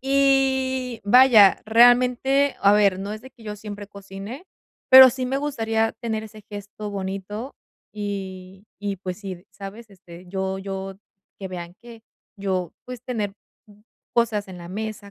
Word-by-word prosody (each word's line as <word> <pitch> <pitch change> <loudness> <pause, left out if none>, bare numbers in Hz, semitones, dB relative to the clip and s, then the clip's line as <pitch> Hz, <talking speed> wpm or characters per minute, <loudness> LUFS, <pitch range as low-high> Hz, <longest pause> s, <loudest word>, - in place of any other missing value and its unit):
Y 265 -2 +1
vaya, 220 -3 +6
realmente, 250 +4 +4
a 200 - +5
ver, 200 -3 +3
no 200 +2 -5
es 215 - -7
de 260 - -12
que 235 -3 -19
yo 210 -1 -5
siempre 205 -1 -8
cocine, 200 - -9 0.5
pero 260 0 +11
sí 255 +1 -4
me 265 +2 -1
gustaría 225 -6 -1
tener 220 -1 -4
ese 215 -1 -13
gesto 205 +1 -7
bonito 200 +5 -5 0.4
y 195 -2 -6
y, 200 -1 -3
pues 185 -1 -6
sí, 190 -3 -8
¿sabes? 205 +3 -10
Este, 180 -2 -14
yo 190 +1 -3
yo 195 0 -6 0.4
que 195 - -6
vean 175 -1 -7
que 235 -2 -13 0.3
yo 190 -3 -2
pues, 250 -2 -9
tener 220 -6 -3 0.8
cosas 225 -3 +1
en 185 -1 -9
la 170 0 -10
mesa, 210 +1 -6
210 Hz, 150 wpm, -23 LUFS, 195-245 Hz, 0.8 s, pero